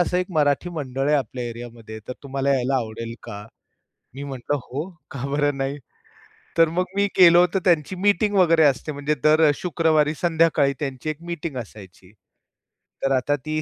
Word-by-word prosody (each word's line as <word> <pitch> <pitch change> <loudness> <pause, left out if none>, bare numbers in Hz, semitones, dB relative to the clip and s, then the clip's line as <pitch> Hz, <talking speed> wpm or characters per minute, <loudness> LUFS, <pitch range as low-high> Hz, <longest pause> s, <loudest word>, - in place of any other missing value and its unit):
असं 175 0 +1
एक 180 - -1
मराठी 150 +1 +1
मंडळ 135 -4 -3
आहे 150 - +4
आपल्या 125 -2 -3
एरियामध्ये. 115 -2 -9
तर 125 - -3
तुम्हाला 140 0 0
यायला 130 +1 0
आवडेल 115 -1 -4
का?" 105 0 -8 0.7
मी 140 - -7
म्हटलं, 135 +1 -3
"हो, 145 +7 -5 0.2
का 135 -2 -6
बरं 145 -1 +1
नाही." 135 +2 -2 0.8
तर 165 -1 +5
मग 180 +3 0
मी 200 - +3
गेलो 175 -2 +8
होतो. 180 +2 +1
तर - - -20
त्यांची 175 0 +2
मीटिंग 205 +2 +1
वगैरे 165 -4 +5
असते 140 +2 +1
म्हणजे 145 +1 -2
दर 155 0 +5
शुक्रवारी 155 -3 +1
संध्याकाळी 160 -4 +2
त्यांची 135 +1 -4
एक 155 +1 -5
मीटिंग 160 -4 -5
असायची. 95 -5 -11 0.9
तर 135 - +1
आता 135 +2 +1
ती 155 0 -2
145 Hz, 170 wpm, -23 LUFS, 130-165 Hz, 0.9 s, गेलो